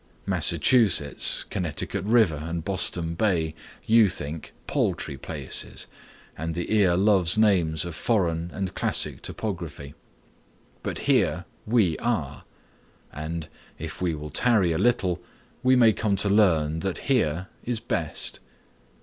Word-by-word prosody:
Massachusetts, 100 - +3
Connecticut 90 -3 -2
River 105 -9 +3
and 85 0 -4
Boston 85 -3 0
Bay 85 -4 0 0.3
you 110 -2 +5
think 75 -2 -6
paltry 70 - -1
places, - - -5 0.5
and 80 +1 -4
the 85 +4 -3
ear 95 -5 +4
loves 95 -2 +3
names 90 -8 +2
of 85 - -6
foreign 85 -4 0
and 95 -1 -4
classic - - 0
topography. 85 -9 -6 0.9
But - - -4
here - - +2 0.2
we 105 -8 +2
are; 75 - -2 0.7
and, 80 +1 -5 0.3
if 80 +2 -7
we 85 -3 0
will 75 0 -8
tarry 105 - +3
a 80 - -1
little, 95 -7 +1 0.4
we 130 0 +4
may 115 -3 +5
come 105 -1 0
to 100 +1 +1
learn 80 -7 +3
that 95 +1 -3 0.2
here 90 - 0
is 120 -2 -2
best. 85 -9 -1
90 Hz, 125 wpm, -25 LUFS, 80-105 Hz, 0.9 s, you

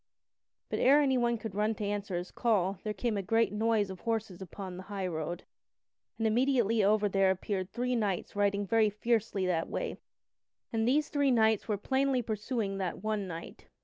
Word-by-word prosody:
But - - -2
ere 280 +3 +6
anyone 250 -4 +2
could 220 -2 -6
run 210 +2 0
to 210 - -4
answer 200 -2 -2
his 175 +1 -5
call 200 -5 +1
there 215 - -2
came 210 +2 -1
a - - 0
great 225 +1 +1
noise 215 -2 +1
of 185 - -8
horses 220 -5 -3
upon 190 0 -7
the 185 - -7
highroad, 175 -4 -3 0.7
and 225 - -1
immediately 230 -2 +2
after 210 +1 +3
there 195 -1 +3
appeared 190 0 -2
three 245 +4 -1
knights 205 -5 -1
riding 205 0 +1
very 220 +1 +3
fiercely 210 -2 0
that 170 -3 0
way, - - -3 0.8
and 225 0 +1
these 295 +4 +2
three 285 -2 +2
knights 220 -4 +3
were 210 -2 0
plainly 265 +3 +1
pursuing 210 -2 -2
that 185 0 -3
one 215 -2 -1
knight. 165 -1 -8
210 Hz, 180 wpm, -31 LUFS, 195-230 Hz, 0.8 s, ere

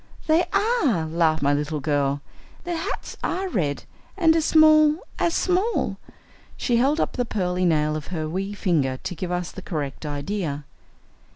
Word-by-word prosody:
"They 320 +3 +3
are," 400 - +2
laughed 160 -1 +1
my 140 +1 +3
little 150 +1 -1
girl. 145 -1 0 0.4
"Their 350 -1 -3
hats 325 - -4
are 380 +2 -1
red, 155 - -1 0.3
and 325 -4 +4
as 320 -2 +2
small 310 -1 +6 0.2
as 335 - +1
small!" 375 +6 +1 0.6
She 240 -3 +1
held 275 +6 +2
up - - 0
the 245 - 0
pearly 185 -5 -1
nail 155 -2 +2
of 155 - -5
her 160 -4 -3
wee 190 +5 -3
finger 150 -10 0
to 180 - -5
give 175 +2 -4
us 180 -1 -2
the 190 - -9
correct 150 -6 -4
idea. 145 0 -3
180 Hz, 165 wpm, -24 LUFS, -, 0.6 s, small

